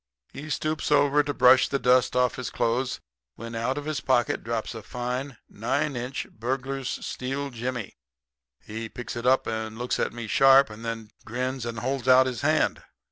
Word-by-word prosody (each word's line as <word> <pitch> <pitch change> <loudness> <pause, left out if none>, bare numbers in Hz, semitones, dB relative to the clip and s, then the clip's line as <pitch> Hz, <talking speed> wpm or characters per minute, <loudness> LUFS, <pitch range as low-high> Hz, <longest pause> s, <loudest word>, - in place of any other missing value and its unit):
"He 150 +3 -8
stoops 155 0 -2
over 145 0 +5
to 145 0 -2
brush 130 -1 +6
the 140 - 0
dust 125 -1 +3
off 125 0 +3
his 130 -3 -4
clothes, 125 +2 -1 0.4
when 115 +4 -8
out 115 +4 -1
of 145 - -4
his 155 -4 -2
pocket 125 -3 +1
drops 115 0 -3
a 115 - -7
fine, 125 +3 -4
nine 140 +6 -1
inch 125 +2 -4
burglar's 130 +3 -3
steel 135 +2 -4
jimmy. 120 - -5 0.6
He 110 +1 -6
picks 120 +2 -7
it 120 +1 -3
up 130 +1 +4
and 110 0 -4
looks 125 +1 -2
at - - 0
me 120 0 -6
sharp, 135 +3 +6
and 105 +2 -10
then 115 -2 -5
grins 125 +1 -3
and 115 -1 -5
holds 130 0 -2
out 130 0 +7
his 125 -5 -3
hand. - - +2
125 Hz, 185 wpm, -26 LUFS, 115-135 Hz, 0.6 s, out